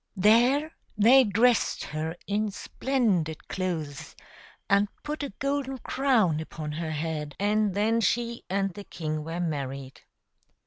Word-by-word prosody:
There 245 - +4 0.2
they 245 +6 +7
dressed 230 +2 +2
her 155 +2 -4
in 210 +1 0
splendid 200 - -1
clothes 165 -7 -4 0.5
and 200 +1 +4 0.2
put 300 +1 -4
a 285 - -3
golden 275 -1 -1
crown 235 - +2
upon 155 -1 -6
her 160 +1 -4
head, 155 -1 -3
and 205 -1 +1
then 220 +3 +2
she 235 +1 0
and 195 0 0
the 205 - -8
king 155 -5 -4
were 165 +2 -4
married. 140 -5 -4
200 Hz, 130 wpm, -27 LUFS, 160-235 Hz, 0.5 s, they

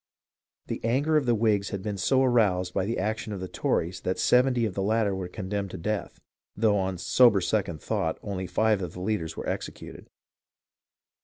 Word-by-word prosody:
The - - -5
anger 135 +7 +1
of 145 -4 +2
the 120 - +4
Whigs 105 -3 +1
had 95 -1 -5
been 105 -2 -3
so 130 +8 +3
aroused 100 -8 +2
by 95 - 0
the 115 - -1
action 110 +2 -2
of 100 - -5
the 95 - -5
Tories 90 0 -1
that 95 - -2
seventy 125 -1 +3
of 105 - -3
the 95 - -2
latter 105 0 +1
were 95 -1 -4
condemned 100 +2 -4
to - - -7
death, 105 +5 -3 0.4
though 105 -1 +3
on 95 -1 -2
sober 105 +4 +5
second 90 -4 -1
thought 80 0 -1
only 95 -3 -4
five 110 -1 +2
of 90 -3 -5
the - - -8
leaders 95 -4 -2
were - - -5
exe - - -2
cuted. - - -12
100 Hz, 200 wpm, -27 LUFS, 95-115 Hz, 0.4 s, sober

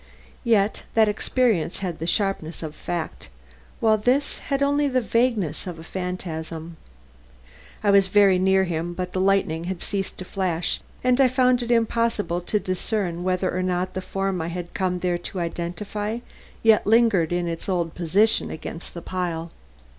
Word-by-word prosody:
Yet, 220 -4 +2
that 220 -1 +6
experience 210 -4 +1
had 180 -4 -4
the 165 - -3
sharpness 195 -5 -1
of 155 -1 -5
fact; 170 - -5 0.5
while 220 -1 +3
this 260 +6 +1
had 275 0 -1
only 285 +1 +2
the 260 -2 +2
vagueness 230 - 0
of 175 -2 -5
a 160 - -10
phantasm. 165 -2 -5 1.1
I 205 - +4
was 200 -1 +5
very 195 -1 +5
near 190 +1 +4
him 175 -1 -2
but 180 0 -4
the 185 - 0
lightning 190 -4 +2
had 185 -1 -4
ceased 195 -2 -3
to 185 - -6
flash, 180 -3 -1 0.2
and 250 +1 +4
I 265 - +7
found 255 -1 +3
it 240 - -4
impossible 230 -6 +1
to 210 +4 0
discern 185 -2 -2
whether 185 0 0
or 185 - 0
not 185 0 -1
the 185 - -3
form 195 -1 -2
I 160 - -3
had 175 0 -5
come 185 -2 0
there 175 -1 0
to 180 +2 -5
identify, 195 +6 -3 0.5
yet 220 -2 +5
lingered 220 -7 +4
in 175 0 0
its 165 +3 -4
old 170 -3 0
position 195 +6 +2
against 165 +2 -7
the 170 - -6
pile. 170 -3 -3
185 Hz, 170 wpm, -24 LUFS, 175-215 Hz, 1.1 s, I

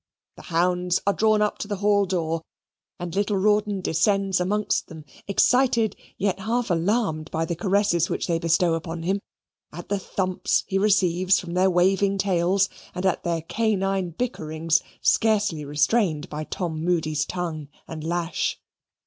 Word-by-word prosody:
The - - -12
hounds 180 +1 +1
are 200 - +3
drawn 215 0 +3
up 210 - -1
to - - -4
the 205 - -2
hall 205 0 +2
door, 165 -3 -1 0.6
and 175 -1 -5
little 205 +1 0
Rawdon 210 0 +1
descends 195 +2 +1
amongst 205 +4 0
them, 160 -3 -11 0.2
excited 235 +1 +3 0.2
yet 195 -1 0
half 230 +2 -1
alarmed 170 -3 0
by 160 +1 -1
the 170 - -3
caresses 185 -2 +1
which - - -2
they 165 -1 0
bestow 170 0 +2
upon 165 0 -4
him, 190 +4 0 0.5
at 175 +2 -9
the 200 0 0
thumps 185 -1 -1
he 195 - -1
receives 185 -2 +3
from 170 -1 -7
their 185 +1 +3
waving 195 +2 +2
tails, 190 0 +2 0.3
and 180 - -3
at 190 - +1
their 165 -2 -1
canine 195 -2 0
bickerings, 165 -5 -1 0.2
scarcely 205 -8 +2
restrained 150 +3 +1
by 155 +1 -5
Tom 160 -3 -4
Moody's 160 -4 0
tongue 165 -5 -4 0.2
and 155 -2 -7
lash. 170 +1 -1
180 Hz, 155 wpm, -24 LUFS, 165-200 Hz, 0.6 s, are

